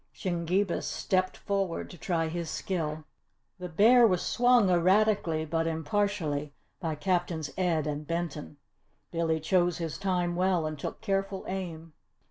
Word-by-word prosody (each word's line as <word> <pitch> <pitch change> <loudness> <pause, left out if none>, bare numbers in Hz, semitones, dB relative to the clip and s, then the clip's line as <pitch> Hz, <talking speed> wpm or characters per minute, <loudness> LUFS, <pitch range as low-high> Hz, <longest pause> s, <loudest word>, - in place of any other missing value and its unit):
Shingebis 180 +1 -1
stepped 185 -1 0
forward 195 -4 -2
to 175 - -11
try 165 -3 0
his 165 0 -4
skill. 155 -4 -3 0.6
The 180 0 -5
bear 230 +8 +6
was 180 -4 +1
swung 245 -3 +4
erratically 180 -2 +3
but 165 +1 -1
impartially 160 -3 -1 0.2
by 160 -4 -2
Captains 175 -2 -1
Ed 170 -5 +1
and 150 0 -4
Benton. 165 -3 -4 0.5
Billy 165 -1 0
chose 175 +1 +2
his 165 -3 -4
time 180 -3 0
well 180 -2 +1
and 155 -1 -4
took - - -5
careful 195 -2 -2
aim. 165 -4 -5
175 Hz, 135 wpm, -29 LUFS, 160-190 Hz, 0.6 s, bear